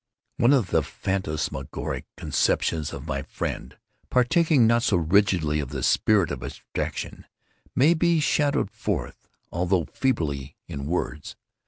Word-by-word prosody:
One 120 - +4
of 125 -10 +2
the - - +4
phantasmagoric 75 -7 -3
conceptions 80 -3 0
of - - -7
my 70 - -2
friend, - - -5 0.3
partaking 140 +1 +4
not 115 +1 +4
so 105 -6 +2
rigidly 85 -3 +2
of 70 -3 -3
the - - -4
spirit 105 -5 +3
of 70 -3 -4
abstraction, - - -5 0.5
may 150 +6 +5
be 170 0 +2
shadowed 145 -7 +1
forth, 105 - -4 0.2
although 90 0 +1
feebly, 75 - -2
in 70 0 -5
words. 75 -2 -3
95 Hz, 130 wpm, -25 LUFS, 75-125 Hz, 0.5 s, may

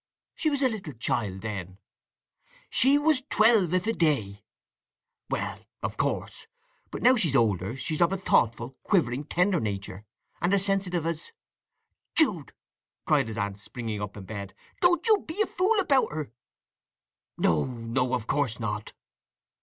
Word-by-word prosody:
'" - - -66
"She 315 - +3
was 285 -2 0
a - - +5
little 205 - -5
child 105 -5 -2
then." 95 -4 -6 0.9
"She 270 +3 +5
was 295 -2 +3
twelve 215 -6 +4
if 185 - 0
a 225 - +1
day." 110 - 0 0.9
"Well—of - - -5
course. - - -2 0.4
But - - -6
now 255 +2 +7
she's 170 - +1
older 105 -3 +1
she's 155 +4 -3
of 170 +1 +4
a 195 - 0
thoughtful, 120 - +1
quivering, 145 - +1
tender 180 +3 +1
nature, 100 -3 -4 0.4
and 175 +4 +3
as 195 0 +1
sensitive 190 -4 0
as—" 165 - -4 0.8
"Jude!" 205 - +4 0.5
cried - - +3
his 110 -1 -6
aunt, 100 -2 -3
springing 110 -1 -5
up 105 0 -6
in 100 - -8
bed. 100 0 -7 0.2
"Don't 350 +3 +3
you 435 -3 +5
be 320 +5 -6
a - - -2
fool 400 +4 +1
about 285 - +2
her!" 150 -5 -5 1.1
"No, 80 -3 +2
no, 125 +1 -1
of 120 -3 -4
course 130 -3 -1
not." 105 -2 -4
145 Hz, 155 wpm, -27 LUFS, -, 1.1 s, now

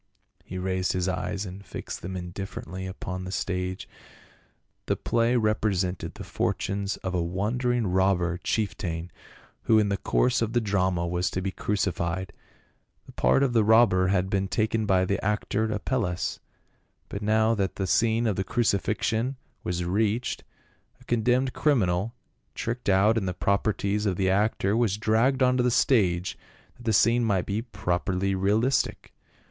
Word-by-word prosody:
He 95 - -7
raised 95 0 -1
his 90 0 -1
eyes 95 +2 -2
and 95 +1 -8
fixed - - -7
them 95 +1 -5
indifferently 95 0 -6
upon 95 -1 -5
the 95 - -6
stage. 95 -1 -3 1.0
The - - +2
play 115 +1 +1
represented 105 -5 0
the - - -8
fortunes 100 +1 -2
of 95 - -2
a 90 - +1
wandering 115 +7 0
robber 90 -2 +1
chieftain 90 -5 -2 0.5
who 110 - +5
in 105 -1 +3
the 100 - 0
course 125 +5 +1
of 115 0 -1
the 120 - +3
drama 95 -5 0
was 90 +1 0
to - - -3
be 95 - -1
crucified: 95 -2 -2 0.7
the - - -13
part 135 - +3
of 130 -3 +1
the 115 -2 +4
robber 110 -4 +5
had 95 -1 +1
been 95 0 0
taken 110 +1 0
by 95 -1 +3
the 100 +1 -1
actor 105 +2 0
Apelles, 105 -4 -2 0.7
but 100 - -6
now 110 +2 +3
that 100 -4 -1
the 95 - -2
scene 115 +5 +2
of 105 -4 0
the 95 - 0
crucifixion 115 +4 0 0.3
was 90 0 -2
reached, 110 +6 0 0.6
a - - -18
condemned 125 +3 +1
criminal, 110 - +1 0.4
tricked 115 -1 -3
out 105 +4 +4
in 95 - -3
the 90 - -2
properties 100 +1 0
of 95 - +1
the 95 0 +1
actor, 100 0 +1
was 115 -4 +1
dragged 115 +5 +2
onto 125 0 +3
the 125 - +3
stage, 95 -8 +2 0.4
that 120 - -14
the 115 - +2
scene 115 +3 +4
might 100 -6 +1
be 105 +2 -2
properly 95 -3 -1
realistic. 110 +7 0
100 Hz, 155 wpm, -26 LUFS, 95-115 Hz, 1.0 s, who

